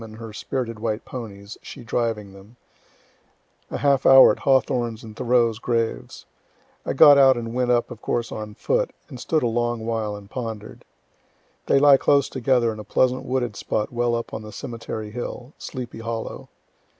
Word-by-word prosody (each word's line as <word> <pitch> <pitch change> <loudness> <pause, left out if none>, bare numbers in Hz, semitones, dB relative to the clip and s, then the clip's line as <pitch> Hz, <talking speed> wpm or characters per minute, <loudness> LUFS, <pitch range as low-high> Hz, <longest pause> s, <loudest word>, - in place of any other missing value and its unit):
and 110 -1 -10
her 115 -1 -9
spirited 115 0 -4
white 110 0 -3
ponies, 105 -4 -8
she - - -10
driving 115 -4 -2
them,) 100 +4 -16 1.1
a - - -4
half 140 -2 +2
hour 135 0 +8
at - - -4
Hawthorne's 125 -4 +1
and 110 -1 -10
Thoreau's 120 -2 +1
graves. 115 -2 -2 0.6
I - - -2
got 145 -1 +8
out 135 -2 +6
and 115 -1 -5
went 125 0 0
up 120 -1 +1
of - - -9
course 120 -1 -2
on 105 -1 -6
foot, - - 0 0.2
and 130 -4 -9
stood 155 +3 0
a - - +2
long 120 0 -1
while 110 -2 -2
and 100 -1 -11
ponder'd. 110 -2 -7 0.8
They - - +4
lie 140 0 +7
close 140 0 +2
together 125 -3 +1
in 110 - -10
a - - -6
pleasant 130 +5 +1
wooded 125 -4 -2
spot 105 +3 -3
well 120 0 +1
up 115 - -4
the 110 -1 -7
cemetery 115 -3 -6
hill, 125 +3 -7
"Sleepy 125 -4 -7
Hollow." 115 -1 -5
120 Hz, 175 wpm, -23 LUFS, 110-130 Hz, 1.1 s, hour